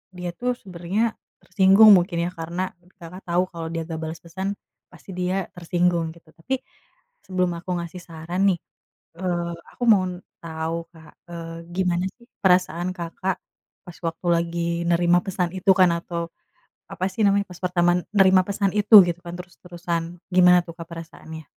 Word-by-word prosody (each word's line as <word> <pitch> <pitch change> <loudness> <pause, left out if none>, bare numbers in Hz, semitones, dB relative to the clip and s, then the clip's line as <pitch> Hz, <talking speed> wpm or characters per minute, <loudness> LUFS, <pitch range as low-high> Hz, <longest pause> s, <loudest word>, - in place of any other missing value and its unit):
dia 180 0 -4
tuh 250 +4 -1
sebenarnya, 190 +5 -2 0.3
tersinggung 200 +2 +6
mungkin 175 0 -1
ya, 180 - -3
karena, 170 +3 -4 0.3
Kakak 175 +3 -10
tau 175 +1 +2
kalo 165 -2 -6
dia 165 -1 -2
gak 160 -1 -4
bales 160 +1 -6
pesan, 190 +4 -4 0.4
pasti 195 - -13
dia 185 +1 -1
tersinggung 175 -1 0
gitu. 165 -1 -20
Tapi, 255 +11 -3 0.7
sebelum 185 -1 0
aku 180 +1 -6
ngasih 170 +2 -8
saran 170 +2 -5
nih, - - -14 0.6
eee, 175 -2 -2 0.2
aku 245 - -6
mau 200 -4 +6 0.4
tau 165 +1 -4
Kak, 160 -1 -16 0.2
eee, 165 -1 -7 0.2
gimana 180 -1 +1 0.2
sih 235 - -20 0.2
perasaan 180 -1 +2
Kakak, 180 +2 -3 0.5
pas 175 -2 -11
waktu 165 +2 -5
lagi 170 0 -1 0.3
nerima 175 +1 +4
pesan 185 -3 -1
itu 185 +1 +3
kan 185 -1 +5
atau, 170 0 -4 0.6
apa 185 - -2
sih 220 - -4
namanya, 200 0 +3
pas 180 - -10
pertama 175 -1 +2
menerima 190 -2 +6
pesan 200 0 0
itu 210 +2 +6
gitu 170 -1 -2
kan 170 - -6
terus-terusan, 175 -2 -5 0.3
gimana 180 -1 +7
tuh 170 - -9
Kak 165 - -7
perasaannya? 160 -1 -9
175 Hz, 160 wpm, -23 LUFS, 170-185 Hz, 0.7 s, gimana